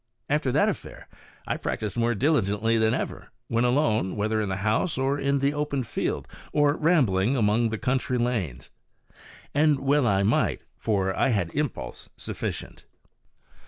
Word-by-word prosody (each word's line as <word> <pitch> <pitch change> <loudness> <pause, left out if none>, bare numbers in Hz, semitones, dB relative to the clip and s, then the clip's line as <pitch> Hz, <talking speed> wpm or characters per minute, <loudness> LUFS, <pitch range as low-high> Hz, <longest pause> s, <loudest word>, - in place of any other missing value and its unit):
After - - +1
that - - +3
affair - - -5 0.4
I - - -2
practised 105 -2 -3
more 120 0 +1
diligently 115 -4 +1
than 110 +2 +3
ever, - - -4 0.2
when 115 +1 +1
alone, 120 -7 +1
whether 110 +1 0
in 105 - -2
the 95 - -1
house 110 +10 +1
or 135 +2 0
in 140 0 +1
the 140 +1 +1
open 145 -2 -1
field, 115 - -3 0.2
or 145 -1 +3
rambling 135 - +2
among 115 +1 +2
country 125 +3 -1
lanes. 115 - -2 0.8
And 150 -1 +3
well 140 -1 +2
I 100 -2 +2
might, 105 +4 +1
for 95 - 0
I - - +2
had 100 -8 0
had - - -17
impulse 135 - -3
sufficient. - - -6
120 Hz, 155 wpm, -26 LUFS, 105-140 Hz, 0.8 s, that